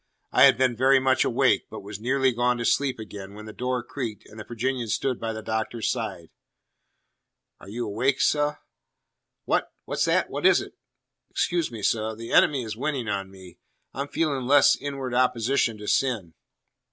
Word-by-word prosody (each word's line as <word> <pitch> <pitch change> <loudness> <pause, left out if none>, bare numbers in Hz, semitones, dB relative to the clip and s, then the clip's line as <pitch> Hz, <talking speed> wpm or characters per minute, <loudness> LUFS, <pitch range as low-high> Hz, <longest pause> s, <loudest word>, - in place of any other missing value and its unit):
I - - +7
had - - +6
been 130 -2 +2
very 130 +3 +4
much 130 0 +2
awake, - - +2
but - - -8
was 100 0 -7
nearly 130 +3 +2
gone 120 +1 +1
to 120 - -3
sleep 135 0 +1
again, 100 -2 -9
when 110 +1 -10
the 110 - -9
door 125 0 -2
creaked 115 -5 -6
and 110 - -13
the - - -6
Virginian 120 +2 -3
stood 125 +4 -1
by 115 0 -3
the 110 0 -6
Doctor's 110 +1 -2
side. 85 -1 -5 1.3
"Are 100 - -13
you 120 +3 -4
awake, 125 +6 0
seh?" 150 0 +2 0.9
"What? - - 0
What's - - 0
that? - - +1
What - - +2
is - - +5
it?" - - -8 0.6
"Excuse 170 -2 0
me, 110 -3 -8
seh. 110 +1 0
The 115 +1 -8
enemy 135 -4 +4
is 110 -2 -5
winning 130 -1 -2
on 100 -1 -3
me. 95 -2 -14 0.3
I'm 140 +1 -3
feeling 140 -5 -1
less 145 +2 +6
inward 135 -2 -5
opposition 125 -1 +1
to 105 0 -9
sin." 110 -12 0
120 Hz, 180 wpm, -25 LUFS, 110-130 Hz, 1.3 s, I